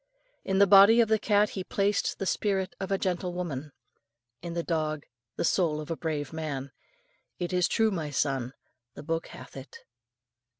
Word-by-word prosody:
In 190 Hz, -, 0 dB
the 200 Hz, -, +7 dB
body 200 Hz, +4 st, +8 dB
of 230 Hz, -2 st, +4 dB
the 220 Hz, -1 st, +3 dB
cat 210 Hz, -1 st, +2 dB
He 190 Hz, -, -4 dB
placed 200 Hz, +2 st, 0 dB
the 195 Hz, -, -3 dB
spirit 190 Hz, -1 st, 0 dB
of 195 Hz, 0 st, -4 dB
a 195 Hz, -, +2 dB
gentle 180 Hz, -1 st, -2 dB
woman; 155 Hz, -5 st, -4 dB, 0.7 s
in 170 Hz, -1 st, -6 dB
the 170 Hz, -, -1 dB
dog 155 Hz, -3 st, -2 dB, 0.3 s
the -, -, -1 dB
soul 160 Hz, -5 st, +1 dB
of 155 Hz, +2 st, -6 dB
a -, -, 0 dB
brave 155 Hz, -3 st, -3 dB
man. 140 Hz, -4 st, -4 dB, 0.7 s
It 175 Hz, 0 st, -3 dB
is 180 Hz, -1 st, +3 dB
true, 220 Hz, -1 st, +2 dB
my 160 Hz, -6 st, -3 dB
son; 135 Hz, -3 st, -1 dB, 0.4 s
the -, -, -9 dB
book 165 Hz, +1 st, -2 dB
hath -, -, -12 dB
it." 135 Hz, +1 st, -10 dB
175 Hz, 180 wpm, -28 LUFS, 155-195 Hz, 0.7 s, body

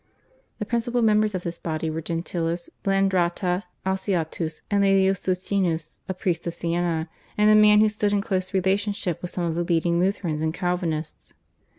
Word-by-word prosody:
The 210 Hz, -, -3 dB
principal 235 Hz, +2 st, 0 dB
members 215 Hz, -1 st, +3 dB
of 180 Hz, -, -3 dB
this 170 Hz, 0 st, -5 dB
body 160 Hz, -1 st, -3 dB
were 160 Hz, +1 st, -3 dB
Gentilis, 170 Hz, +1 st, -3 dB
Blandrata, 185 Hz, -1 st, +1 dB, 0.2 s
Alciatus, 180 Hz, -4 st, -2 dB
and 200 Hz, 0 st, +3 dB
Laelius 195 Hz, -1 st, +3 dB
Socinus, 180 Hz, -3 st, -1 dB
a 190 Hz, -, -2 dB
priest 175 Hz, -2 st, -2 dB
of 170 Hz, -, -3 dB
Siena 170 Hz, -1 st, -1 dB, 0.3 s
and 210 Hz, 0 st, +5 dB
a -, -, +7 dB
man 210 Hz, 0 st, +7 dB
who 215 Hz, -, +5 dB
stood 210 Hz, -1 st, 0 dB
in 205 Hz, -, +2 dB
close 185 Hz, -2 st, -2 dB
relationship 195 Hz, -1 st, 0 dB
with 180 Hz, -, -4 dB
some 175 Hz, -, -3 dB
of 170 Hz, -1 st, 0 dB
the 170 Hz, +1 st, -1 dB
leading 170 Hz, 0 st, +1 dB
Lutherans 180 Hz, -4 st, 0 dB
and 160 Hz, +1 st, -1 dB
Calvinists. 175 Hz, -4 st, -3 dB
180 Hz, 170 wpm, -24 LUFS, 170-200 Hz, 0.3 s, a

